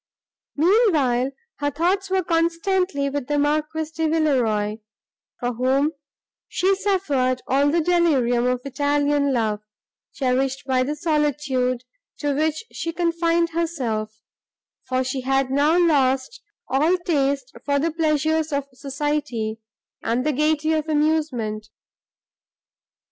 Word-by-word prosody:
Meanwhile, 300 - +3 0.3
her 290 0 0
thoughts 365 +6 0
were 380 0 +1
constantly 335 -1 0
with 280 -2 -3
the 295 - 0
Marquis 305 +2 0
de 320 0 0
Villeroi, 240 -10 +1 0.6
for 245 0 -2
whom 265 +5 +1 0.6
she 380 +2 +1
suffered 290 -11 0
all 280 +2 +2
the 335 +3 +2
delirium 280 -9 +2
of 250 0 0
Italian 285 +1 +1
love, 220 -4 0 0.5
cherished 265 0 0
by 260 -1 +1
the 285 +4 -1
solitude, 290 -5 0 0.3
to 290 -1 -1
which 310 +4 0
she 330 - -4
confined 335 0 +1
herself; 230 -11 -3 0.6
for 255 0 0
she 255 +1 -3
had 270 0 0
now 290 +5 +3
lost 275 - +2 0.3
all 310 +7 +2
taste 280 -6 -1
for 285 -1 +1
the 325 +4 0
pleasures 315 0 +1
of 280 -1 -1
society 270 -5 -3 0.4
and 240 +4 -1
the 305 - +1
gaiety 305 +2 +1
of 310 0 -1
amusement. 295 -9 0
290 Hz, 120 wpm, -23 LUFS, 255-320 Hz, 0.6 s, Meanwhile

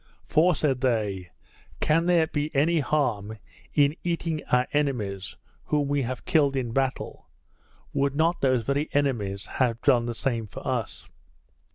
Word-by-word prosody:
"For," 170 +2 +3
said 135 -5 0
they, 105 -8 0 0.5
"can 165 +3 +2
there 170 -2 +4
be 150 -1 -2
any 160 +4 +3
harm 120 -8 0 0.4
in 145 +1 +4
eating 165 -2 -1
our 125 0 +4
enemies, 110 -10 -1 0.3
whom 145 -2 0
we 145 0 +1
have 125 0 -4
killed 150 -6 +3
in 125 -3 -2
battle? 135 +1 -2 0.6
Would 140 0 0
not 165 +3 +1
those 130 -3 +2
very 140 +5 -1
enemies 110 -9 0
have 120 -3 0
done 120 -2 +4
the 120 - -3
same 115 -3 -2
to - - -7
us?" - - -3
135 Hz, 150 wpm, -26 LUFS, 120-150 Hz, 0.6 s, there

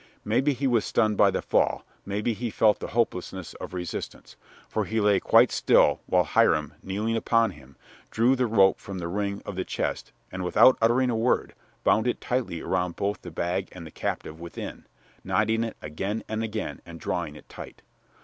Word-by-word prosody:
Maybe 130 +7 +2
he 135 +2 -3
was 120 -5 +3
stunned 110 -2 +1
by - - +5
the - - -2
fall; - - +1 0.2
maybe 105 +4 -1
he 120 +2 -4
felt 110 -1 +3
the - - -5
hopelessness 95 -5 -1
of - - -7
resistance, 90 -1 -6 0.3
for - - -1
he 110 +1 -1
lay 105 -2 +4
quite - - +5
still - - +3
while - - +3
Hiram, 75 -2 +2
kneeling 105 +4 -2
upon 115 -1 +2
him, 70 -4 -17 0.3
drew 120 +4 +3
the 125 -1 +1
rope 100 -4 +4
from 100 -1 -7
the 85 -2 -4
ring 100 +2 -3
of 100 - -6
the 95 - -2
chest - - -3 0.2
and, 95 0 -4
without 125 +8 +6
uttering 125 +3 +3
a - - -1
word, 115 +3 +1 0.3
bound 110 +3 +3
it 120 - 0
tightly 120 -10 -2
around 90 -1 -1
both 100 +1 -2
the - - -8
bag 90 +3 -2
and 90 -2 -9
the 80 - -10
captive 80 +1 -4
within, 85 0 -8 0.4
knotting 110 +2 +1
it 115 - -5
again 95 +9 -3
and 110 +1 -2
again 110 -1 -4
and 85 -1 -11
drawing 85 -4 -3
it 75 - -14
tight. - - -11
105 Hz, 190 wpm, -26 LUFS, 90-115 Hz, 0.4 s, without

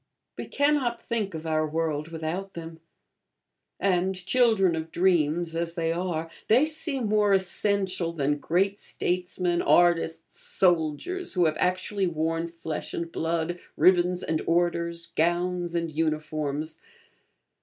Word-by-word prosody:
We - - -6
cannot 285 -4 +1
think 210 -6 -3
of 160 0 -6
our 155 -1 +1
world 155 -1 -2
without 165 +4 -5
them; 165 -1 -8 1.0
and, 190 0 +1
children 195 -1 +3
of 160 0 -4
dreams 170 -2 +1
as 170 0 -2
they 165 -1 0
are, 170 -2 -2 0.2
they 245 +7 +5
seem 310 -5 -2
more 210 -1 +3
essential 190 -2 +1
than 145 -2 -1
great 195 +6 +1
statesmen, 180 -1 -1
artists, 165 -2 +2
soldiers, 180 - 0
who 180 -2 +3
have 155 -1 +1
actually 185 +2 0
worn 165 0 -1
flesh 165 -2 -6
and 170 0 -4
blood, 165 +1 -2 0.2
ribbons 180 0 +4
and 160 -1 -1
orders, 170 0 0
gowns 175 +1 0
and 170 -1 -1
uniforms. 155 -1 -2
170 Hz, 125 wpm, -26 LUFS, 160-190 Hz, 1.0 s, they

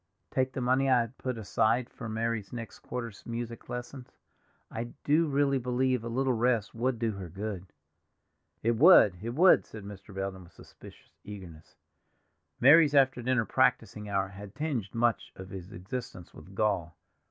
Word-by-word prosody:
"Take 130 0 0
the 130 - -3
money 130 +2 +2
I 125 -2 +5
had 115 +2 -7
put 130 -2 -3
aside 115 +3 +1
for 115 -4 -8
Mary's 110 -2 -2
next 115 -2 -7
quarter's 120 -5 -6
music 115 0 -6
lessons; 125 +1 -6 0.6
I 120 +1 -6
do 155 +3 +3
really 140 -1 +2
believe 125 0 0
a - - -5
little 130 +2 +1
rest 120 -2 +1
would 120 +2 -1
do 115 -1 0
her 95 -4 -7
good." 95 +1 -6 1.0
"It 115 0 +1
would—it 115 - +6
would," 180 +5 +6
said 110 -2 -11
Mr. 100 0 -11
Belden 95 -1 -5
with - - -20
suspicious - - -16
eagerness. 90 -7 -11 0.8
Mary's 150 +2 +6
after 135 -2 +4
dinner 125 -1 +1
practicing 110 -4 +1
hour 95 -1 0
had 100 0 -11
tinged 140 -10 -2
much 115 -1 0
of 95 0 -10
his 95 0 -8
existence 95 -1 -7
with 90 +5 -14
gall. 95 -6 -1
115 Hz, 160 wpm, -29 LUFS, 100-130 Hz, 1.0 s, would—it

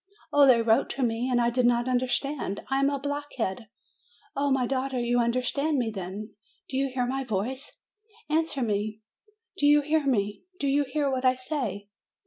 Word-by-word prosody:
Oh, 290 -1 +7
they 235 -3 +6
wrote 225 0 +3
to 275 - -1
me, 235 +1 0
and 245 -1 +2
I 235 0 +2
did 245 0 +3
not 240 0 +2
understand. 255 -3 -1
I 270 - +2
am 275 0 +3
a 285 - -1
blockhead. 275 -7 -3 0.7
Oh, 280 +1 +1
my 265 -2 +2
daughter, 265 0 -1
you 240 0 +1
understand 255 +5 +1
me, 235 -3 0
then? 195 +3 -6 0.4
Do 265 - -5
you 275 0 +1
hear 250 -1 0
my 270 +2 -2
voice? 255 +5 -3 0.5
Answer 310 -3 0
me: 210 0 -2 0.6
do 290 - +4
you 295 0 +6
hear 300 0 +1
me? 205 -5 0 0.2
Do 280 - 0
you 285 +1 +2
hear 285 -1 +1
what 260 -1 -1
I 255 0 +4
say?" 250 -7 -4
255 Hz, 185 wpm, -27 LUFS, 235-280 Hz, 0.7 s, Oh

